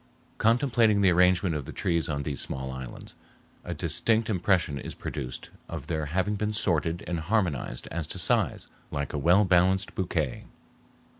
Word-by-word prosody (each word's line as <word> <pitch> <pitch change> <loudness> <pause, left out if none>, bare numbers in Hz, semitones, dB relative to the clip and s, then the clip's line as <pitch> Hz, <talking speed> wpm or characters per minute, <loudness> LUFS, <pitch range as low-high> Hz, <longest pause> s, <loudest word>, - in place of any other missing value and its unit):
Contemplating 115 -3 +3
the 95 -2 +5
arrangement 90 0 +3
of 75 -3 -3
the - - -7
trees 85 -3 -1
on 70 -2 -2
these 70 -3 -3
small 65 -1 -4
islands, 65 -1 -8 0.5
a - - -5
distinct 115 0 +2
impression 90 -6 +1
is - - -7
produced 65 0 -6 0.2
of 80 -5 -6
their 80 -1 -2
having 95 +7 0
been 105 +1 -1
sorted 85 -4 0
and 85 -1 -2
harmonized 80 - -1
as 80 -1 -3
to - - -5
size - - +1 0.2
like 70 -1 -3
a 75 - -1
well 90 +8 +5
balanced 95 +2 +3
bouquet. 80 -8 -2
85 Hz, 160 wpm, -27 LUFS, 75-100 Hz, 0.5 s, the